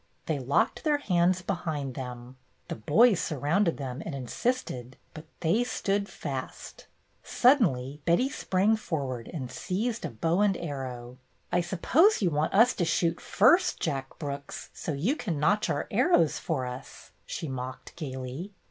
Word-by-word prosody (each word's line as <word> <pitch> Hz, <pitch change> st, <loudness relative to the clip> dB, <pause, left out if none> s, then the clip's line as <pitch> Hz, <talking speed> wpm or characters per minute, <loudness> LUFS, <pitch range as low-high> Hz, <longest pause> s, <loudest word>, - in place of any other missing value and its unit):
They 155 Hz, -3 st, -1 dB
locked 135 Hz, +2 st, +1 dB
their 300 Hz, -2 st, +3 dB
hands 180 Hz, -7 st, +2 dB
behind 160 Hz, -8 st, -3 dB
them. 125 Hz, -1 st, -7 dB, 0.3 s
The -, -, -3 dB
boys 185 Hz, -, +4 dB
surrounded 160 Hz, +5 st, +1 dB
them 130 Hz, -2 st, -5 dB
and 155 Hz, -, -5 dB
insisted, 130 Hz, -, -3 dB, 0.2 s
but 155 Hz, 0 st, -9 dB, 0.2 s
they 195 Hz, +9 st, +2 dB
stood 200 Hz, -4 st, -1 dB
fast. 130 Hz, -2 st, -6 dB, 0.4 s
Suddenly 150 Hz, -, +3 dB
Betty 175 Hz, -, +3 dB
sprang 205 Hz, -4 st, +1 dB
forward 135 Hz, -, -4 dB
and 130 Hz, -7 st, -5 dB
seized 220 Hz, -, -2 dB
a -, -, -2 dB
bow 165 Hz, -, 0 dB
and 205 Hz, -2 st, +3 dB
arrow. 130 Hz, -5 st, -6 dB, 0.3 s
"I 175 Hz, -, +3 dB
suppose 250 Hz, -, +3 dB
you 180 Hz, -5 st, +1 dB
want 150 Hz, +1 st, 0 dB
us 230 Hz, +5 st, +5 dB
to 180 Hz, -, +1 dB
shoot 165 Hz, 0 st, +1 dB
first, -, -, +4 dB
Jack 135 Hz, -1 st, -3 dB
Brooks, 140 Hz, -2 st, -6 dB
so -, -, -4 dB
you 180 Hz, -, 0 dB
can 165 Hz, -, -3 dB
notch 200 Hz, +8 st, +2 dB
our -, -, -1 dB
arrows 255 Hz, -, +3 dB
for 135 Hz, -6 st, -2 dB
us," 125 Hz, +1 st, -9 dB, 0.2 s
she 160 Hz, -, -4 dB
mocked 130 Hz, -1 st, -6 dB
gayly. 135 Hz, +5 st, -6 dB
160 Hz, 150 wpm, -28 LUFS, 130-195 Hz, 0.4 s, us